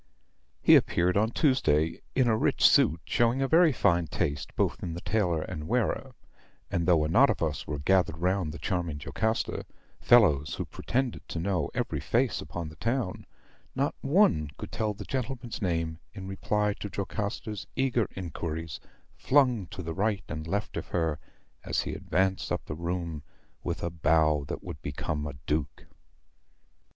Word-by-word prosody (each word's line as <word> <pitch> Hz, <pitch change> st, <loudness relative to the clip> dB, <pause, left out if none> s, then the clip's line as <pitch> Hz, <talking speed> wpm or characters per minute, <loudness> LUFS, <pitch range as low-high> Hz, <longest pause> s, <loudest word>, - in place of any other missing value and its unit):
"He -, -, +8 dB
appeared 90 Hz, +1 st, +3 dB
on 110 Hz, +2 st, +3 dB
Tuesday, 85 Hz, -, +2 dB
in 130 Hz, -2 st, +3 dB
a 110 Hz, -, +4 dB
rich -, -, +4 dB
suit, 80 Hz, +1 st, +4 dB
showing 120 Hz, +2 st, +2 dB
a -, -, +1 dB
very 165 Hz, +2 st, +6 dB
fine 85 Hz, -, +2 dB
taste 70 Hz, 0 st, -2 dB
both -, -, 0 dB
in 85 Hz, -2 st, -4 dB
the 85 Hz, -, -6 dB
tailor 90 Hz, -8 st, 0 dB
and 75 Hz, -4 st, -6 dB
wearer; 125 Hz, +2 st, -1 dB, 0.6 s
and 85 Hz, 0 st, 0 dB
though 80 Hz, -4 st, +4 dB
a -, -, 0 dB
knot 80 Hz, -, +5 dB
of -, -, 0 dB
us -, -, -2 dB
were 75 Hz, -, -3 dB
gathered 80 Hz, +1 st, +2 dB
round 90 Hz, -1 st, 0 dB
the 85 Hz, -, -7 dB
charming 85 Hz, -6 st, -2 dB
Jocasta, 110 Hz, +9 st, -1 dB, 0.4 s
fellows 80 Hz, -, +5 dB
who -, -, -3 dB
pretended 130 Hz, 0 st, -2 dB
to 85 Hz, -, -3 dB
know 90 Hz, -4 st, 0 dB
every -, -, -1 dB
face -, -, +1 dB
upon 85 Hz, -3 st, -5 dB
the 80 Hz, -, -13 dB
town, 115 Hz, -, -2 dB, 0.5 s
not 140 Hz, +2 st, +1 dB
one 140 Hz, -, +3 dB
could -, -, -7 dB
tell 110 Hz, -2 st, -1 dB
the -, -, -8 dB
gentleman's 130 Hz, -2 st, -4 dB
name 85 Hz, -3 st, -1 dB, 0.2 s
in 95 Hz, -2 st, -7 dB
reply 105 Hz, +2 st, 0 dB
to 105 Hz, -, -5 dB
Jocasta's 105 Hz, +1 st, -4 dB
eager 125 Hz, -6 st, +1 dB
inquiries, 80 Hz, -3 st, -5 dB, 0.3 s
flung 125 Hz, -8 st, +2 dB
to 90 Hz, -, -7 dB
the 80 Hz, 0 st, -4 dB
right 100 Hz, +3 st, 0 dB
and 80 Hz, +1 st, -5 dB
left 100 Hz, +5 st, -2 dB
of -, -, -4 dB
her 80 Hz, -3 st, -1 dB, 0.4 s
as -, -, 0 dB
he -, -, -4 dB
advanced 95 Hz, +3 st, 0 dB
up -, -, -2 dB
the -, -, -5 dB
room 85 Hz, -1 st, -3 dB, 0.4 s
with 85 Hz, 0 st, -3 dB
a 85 Hz, -, -1 dB
bow 75 Hz, -2 st, +2 dB
that -, -, -5 dB
would -, -, -7 dB
become 75 Hz, +1 st, -3 dB
a 70 Hz, -, -6 dB
duke. 75 Hz, -1 st, -2 dB
90 Hz, 170 wpm, -28 LUFS, 80-110 Hz, 0.6 s, He